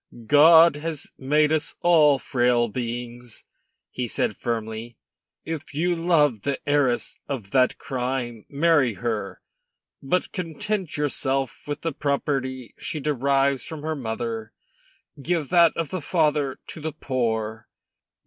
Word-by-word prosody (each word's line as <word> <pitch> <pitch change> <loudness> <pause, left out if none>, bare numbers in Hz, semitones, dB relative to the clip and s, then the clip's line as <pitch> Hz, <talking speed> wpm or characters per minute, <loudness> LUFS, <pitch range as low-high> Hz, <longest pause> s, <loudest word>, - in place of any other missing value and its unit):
"God 160 +4 +7
has 155 -1 -5
made 150 +3 +2
us 155 -1 -1
all 155 -5 +5
frail 120 -2 +1
beings," 120 0 -5 0.5
he 125 -1 -3
said 105 - -1
firmly. 115 0 -4 0.5
"If 155 -3 -6
you 175 +3 +1
love 155 - +2
the 140 +2 -1
heiress 145 -4 +1
of 120 -9 -5
that 130 -1 +3
crime, 125 -3 -4
marry 145 -6 +3
her; 110 -4 -3 0.6
but 180 +7 -1
content 185 +1 -2
yourself 135 -3 -1
with 145 - -4
the 165 -2 -2
property 135 -3 -2
she 155 - -3
derives 140 -2 +1
from 160 -3 -6
her 160 0 -2
mother; 115 -3 -4 0.7
give 165 -1 -1
that 170 -2 +5
of 165 -3 -2
the 185 - -3
father 150 -4 +1
to 160 - -9
the 155 0 -3
poor." 110 -5 -2
140 Hz, 130 wpm, -24 LUFS, 120-155 Hz, 0.7 s, God